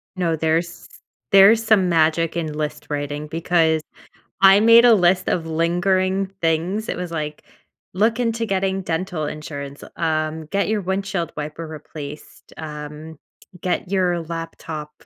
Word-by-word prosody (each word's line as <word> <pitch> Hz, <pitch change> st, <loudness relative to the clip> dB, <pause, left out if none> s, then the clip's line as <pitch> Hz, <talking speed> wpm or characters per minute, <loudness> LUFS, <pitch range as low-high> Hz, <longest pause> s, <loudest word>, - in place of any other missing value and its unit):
No. 175 Hz, -3 st, 0 dB
There's 165 Hz, +2 st, -1 dB, 0.4 s
there's 200 Hz, +3 st, +7 dB
some 210 Hz, -5 st, +3 dB
magic 165 Hz, 0 st, +2 dB
in 160 Hz, -3 st, -2 dB
list 150 Hz, 0 st, -4 dB
writing 145 Hz, 0 st, -3 dB
because 165 Hz, 0 st, +1 dB, 0.6 s
I 195 Hz, +1 st, +8 dB
made 230 Hz, +2 st, +7 dB
a 235 Hz, -, +7 dB
list 185 Hz, -1 st, +3 dB
of 165 Hz, -2 st, -1 dB
lingering 185 Hz, +4 st, +1 dB
things 170 Hz, +7 st, 0 dB
it -, -, -2 dB
was, 180 Hz, -1 st, -4 dB
like, 150 Hz, -2 st, -4 dB, 0.5 s
"Look 220 Hz, +5 st, +1 dB
into 230 Hz, -1 st, 0 dB
getting 195 Hz, -1 st, -1 dB
dental 165 Hz, -1 st, -3 dB
insurance, 145 Hz, -2 st, -7 dB
um, 155 Hz, -1 st, -1 dB
get 200 Hz, +4 st, 0 dB
your 215 Hz, -1 st, 0 dB
windshield 190 Hz, -2 st, -2 dB
wiper 150 Hz, +2 st, -5 dB
replaced. 150 Hz, -1 st, -10 dB
Um, 150 Hz, 0 st, -8 dB, 0.4 s
get 180 Hz, 0 st, -2 dB
your 180 Hz, -3 st, +1 dB
laptop 165 Hz, -2 st, -6 dB
170 Hz, 135 wpm, -21 LUFS, 155-190 Hz, 0.6 s, I